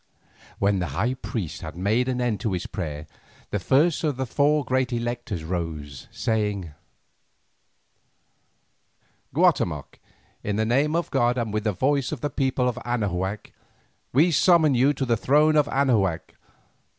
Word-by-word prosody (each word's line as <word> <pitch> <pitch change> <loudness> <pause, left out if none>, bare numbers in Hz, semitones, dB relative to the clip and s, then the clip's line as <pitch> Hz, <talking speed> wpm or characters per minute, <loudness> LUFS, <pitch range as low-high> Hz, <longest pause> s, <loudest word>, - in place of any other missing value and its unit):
When 100 -1 +1
the 90 - -1
high 120 +7 +1
priest 110 - -5
had 80 - -7
made 110 +7 +1
an 125 -1 -1
end 120 -3 -1
of 110 - 0
his 90 - -3
prayer, 75 -5 -5 0.5
the 105 - 0
first 150 - +2
of 150 -5 0
the 135 - -1
four 145 +3 +2
great 130 +1 0
electors 120 -6 -3
rose, 80 -5 -5
saying: 105 -7 -2 2.6
"Guatemoc, - - +1 0.4
in 105 - -2
the 110 +1 +1
name 140 +7 +2
of 170 - -1
god 120 -3 +2
and 115 -3 -2
with 105 +1 -2
the 105 - +2
voice 135 +5 0
of 150 -6 -5
the 145 - -2
people 130 -2 0
of 125 0 -2
Anahuac, 100 -4 -2 0.6
we 160 +7 +4
summon 160 -1 +4
you 130 +3 +4
to 135 -2 -2
the 120 -2 +2
throne 150 +6 +3
of 150 -1 +4
Anahuac. 115 - +1
120 Hz, 150 wpm, -24 LUFS, 100-135 Hz, 2.6 s, we